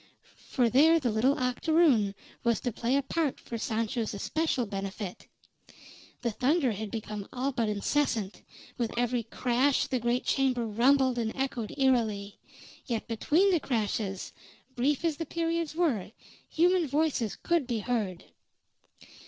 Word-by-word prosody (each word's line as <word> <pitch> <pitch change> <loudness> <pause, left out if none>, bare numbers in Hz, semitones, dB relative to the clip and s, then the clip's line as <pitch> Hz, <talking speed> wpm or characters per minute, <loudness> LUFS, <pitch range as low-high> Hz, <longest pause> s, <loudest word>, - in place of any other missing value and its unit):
For 245 -3 +2
there 310 +8 +5
the 250 -6 0
little 255 +7 +2
octoroon 250 -5 +2 0.3
was 235 -2 +2
to 245 - -1
play 235 +4 0
a 280 - +2
part 300 +1 -1
for 230 - -6
Sancho's 225 0 -2
especial 290 +3 -1
benefit. 195 -1 -6 1.0
The 235 - 0
thunder 265 +4 +2
had 215 0 -5
become 210 -2 -5
all 260 +2 -1
but 230 -4 -1
incessant; 215 -1 -1 0.4
with 235 -1 -2
every 245 0 +1
crash 250 +4 +1
the 260 -2 -1
great 240 +2 0
chamber 255 -3 +1
rumbled 250 +3 +3
and 225 -1 -1
echoed 260 -5 -3
eerily; 220 -7 +1 0.5
yet 235 -4 -2
between 315 - +2
the 345 - +3
crashes, 210 -6 -2 0.4
brief 280 +6 +1
as 320 -3 0
the 330 - -3
periods 335 -2 -2
were, 275 - 0 0.4
human 350 0 +3
voices 285 -6 0
could 335 -6 0
be 240 -3 -1
heard. 205 -7 -2
245 Hz, 140 wpm, -29 LUFS, 220-285 Hz, 1.0 s, there